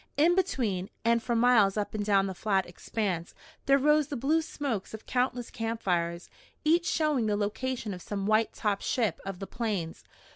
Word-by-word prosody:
In 325 +4 +5
between, 235 - 0 0.2
and 230 0 +3
for 235 +1 -1
miles 230 -4 +4
up 210 - -2
and 215 -1 -2
down 200 -2 +3
the 190 - -3
flat 195 0 0
expanse, 180 -1 -3 0.3
there 275 0 +6
rose 300 +1 +3
the 285 - -4
blue 300 +7 +2
smokes 265 -10 -4
of 220 - -12
countless 250 -1 -1
camp 225 0 -4
fires, 170 -2 -1 0.4
each 340 +3 +3
showing 300 -10 +1
the 205 -1 +1
location 215 +2 -2
of 180 - -8
some 200 +1 -4
white 215 +1 +3
topped 205 -2 -1
ship 225 -8 0
of 195 -2 -4
the 195 - -6
Plains. 200 -8 -3
220 Hz, 185 wpm, -29 LUFS, 195-260 Hz, 0.4 s, there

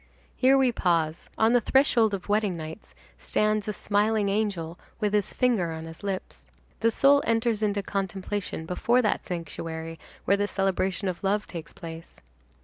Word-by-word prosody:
Here 265 +1 +5
we 260 -2 +4
pause. 165 -6 0
On 220 +2 +4
the 245 - +5
threshold 230 -4 +3
of 185 - -9
wedding 205 -3 +1
nights 160 +5 -9 0.2
stands 215 0 0
a 210 - -1
smiling 205 +1 +1
angel 195 -5 -2 0.2
with 210 -2 0
his 205 -2 +1
finger 230 -10 +1
on 160 0 -6
his 165 0 -10
lips. 195 -2 -5 0.3
The 230 - +3
soul 280 +5 +5
enters 225 -1 +1
into 205 -1 0
contemplation 195 -2 -3
before 235 +8 +2
that 210 - 0
sanctuary 165 -1 -5 0.3
where 200 - +3
the 205 0 0
celebration 195 0 0
of 185 +1 -4
love 205 +2 +1
takes 160 -4 -8
place. 165 0 -10
200 Hz, 160 wpm, -27 LUFS, 170-220 Hz, 0.3 s, Here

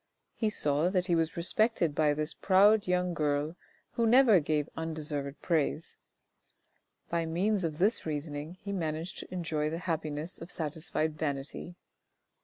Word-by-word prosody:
He 220 - 0
saw 150 -4 +1
that 185 -1 +1
he 175 - +1
was 165 0 0
respected 180 -1 +2
by 150 0 +2
this 155 +1 -1
proud 205 +2 +4
young 180 0 +1
girl 150 0 0 0.4
who 230 -1 +1
never 235 -4 +6
gave 150 -1 0
undeserved 150 -3 -4
praise; 165 -1 0 1.2
by 170 -1 0
means 190 +5 +1
of 155 -2 -2
this 205 +7 +2
reasoning 150 +1 -4
he 200 - -4
managed 165 -2 -3
to - - -9
enjoy 160 -4 -1
the 165 - -3
happiness 155 0 -2
of 165 - -8
satisfied 155 -1 -2
vanity. 145 +3 -4
160 Hz, 145 wpm, -30 LUFS, 150-180 Hz, 1.2 s, never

